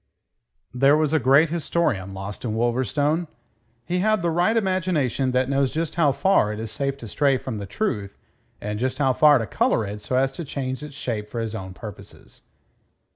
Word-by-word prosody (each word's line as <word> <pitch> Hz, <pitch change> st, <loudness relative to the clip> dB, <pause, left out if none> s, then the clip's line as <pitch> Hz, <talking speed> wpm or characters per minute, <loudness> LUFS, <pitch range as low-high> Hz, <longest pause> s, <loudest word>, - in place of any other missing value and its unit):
There 135 Hz, +4 st, +4 dB
was 155 Hz, -1 st, +1 dB
a 160 Hz, -, +4 dB
great 140 Hz, +5 st, +4 dB
historian 145 Hz, -, -1 dB
lost 95 Hz, +1 st, -7 dB
in 110 Hz, -3 st, -2 dB
Wolverstone. 130 Hz, -, 0 dB, 0.6 s
He 180 Hz, +5 st, -1 dB
had 215 Hz, -1 st, +2 dB
the 170 Hz, -, +1 dB
right 180 Hz, +7 st, +2 dB
imagination 180 Hz, -, 0 dB
that 125 Hz, 0 st, +1 dB
knows 140 Hz, -1 st, +1 dB
just 160 Hz, 0 st, -2 dB
how 160 Hz, -5 st, +3 dB
far 135 Hz, -, +2 dB
it 105 Hz, -, -5 dB
is 110 Hz, -1 st, -5 dB
safe 140 Hz, -1 st, -2 dB
to 120 Hz, -, -9 dB
stray 140 Hz, +4 st, +2 dB
from 125 Hz, -4 st, -5 dB
the 100 Hz, -, -6 dB
truth 105 Hz, -, -3 dB, 0.4 s
and 105 Hz, 0 st, -4 dB
just 130 Hz, +2 st, -1 dB
how 135 Hz, -3 st, +2 dB
far 150 Hz, +2 st, +6 dB
to 115 Hz, -, -2 dB
colour 110 Hz, +1 st, +1 dB
it 105 Hz, +1 st, -6 dB
so 115 Hz, +5 st, -3 dB
as 135 Hz, +1 st, +2 dB
to 150 Hz, +6 st, -6 dB
change 130 Hz, -2 st, -4 dB
its 150 Hz, -2 st, -9 dB
shape 110 Hz, -7 st, -4 dB
for 115 Hz, -, -4 dB
his 115 Hz, -1 st, -3 dB
own 95 Hz, -4 st, -6 dB
purposes. 105 Hz, -2 st, -11 dB
135 Hz, 195 wpm, -23 LUFS, 110-155 Hz, 0.6 s, far